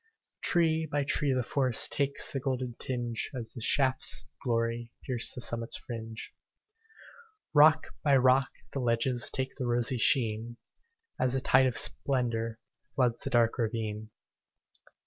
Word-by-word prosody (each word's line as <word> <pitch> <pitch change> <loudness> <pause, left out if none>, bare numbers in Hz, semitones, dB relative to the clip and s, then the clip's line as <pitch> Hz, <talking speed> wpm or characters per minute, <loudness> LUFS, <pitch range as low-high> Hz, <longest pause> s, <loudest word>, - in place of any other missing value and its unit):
Tree 160 -2 +1
by 145 0 +1
tree 140 0 0
the 130 -1 0
forest 130 -1 +2
Takes 140 -1 0
the 135 - -2
golden 130 -2 -3
tinge, 120 -3 -3
As 120 -3 -7
the 120 - -8
shafts 130 +2 +2
of - - -26
glory 115 -1 -1
Pierce 125 -2 +1
the 125 - -8
summit's 115 0 -2
fringe. 115 -2 -8 1.2
Rock 155 +1 +5
by 140 -3 +4
rock 130 0 +4 0.2
the 140 - -2
ledges 120 0 +1
Take 130 0 -3
the 130 -3 -3
rosy 120 +1 0
sheen, 115 -1 +1 0.6
As 130 -1 +1
the 135 - +1
tide 130 0 +4
of 125 - -1
splendor 120 -6 0 0.4
Floods 125 -3 +1
the - - -3
dark 120 -2 +2
ravine. 110 -2 -3
125 Hz, 145 wpm, -29 LUFS, 115-135 Hz, 1.2 s, Rock